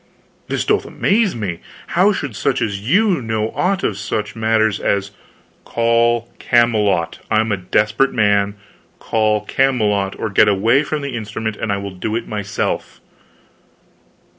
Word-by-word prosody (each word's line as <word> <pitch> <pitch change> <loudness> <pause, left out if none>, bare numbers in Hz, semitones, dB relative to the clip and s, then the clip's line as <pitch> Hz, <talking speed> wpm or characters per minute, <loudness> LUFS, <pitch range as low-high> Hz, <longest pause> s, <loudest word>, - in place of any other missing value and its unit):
"This - - -2
doth - - +1
amaze 210 -1 +1
me! 95 -7 -4 0.3
How 190 +4 +4
should 140 - -4
such 135 +5 0
as 100 -2 -2
you 180 - +2
know 110 -1 -2
aught 190 +1 0
of 100 -2 -1
such 105 +2 -3
matters 110 -1 +1
as 100 0 -1 0.3
" - - -35
"Call 115 0 +1
Camelot! 105 -8 +2
I 110 - +3
am 110 0 0
a 100 - +1
desperate 105 +8 +1
man. 100 -2 +2 0.4
Call 110 -1 +1
Camelot, 105 -7 0
or 110 - -3
get 105 +2 +5
away 110 +7 +3
from 150 0 -3
the 140 -3 -4
instrument 110 -1 -4
and 105 - -3
I 100 - 0
will 100 0 -5
do 105 +4 -3
it 115 - -3
myself." 105 0 -3
110 Hz, 155 wpm, -19 LUFS, 105-120 Hz, 0.4 s, get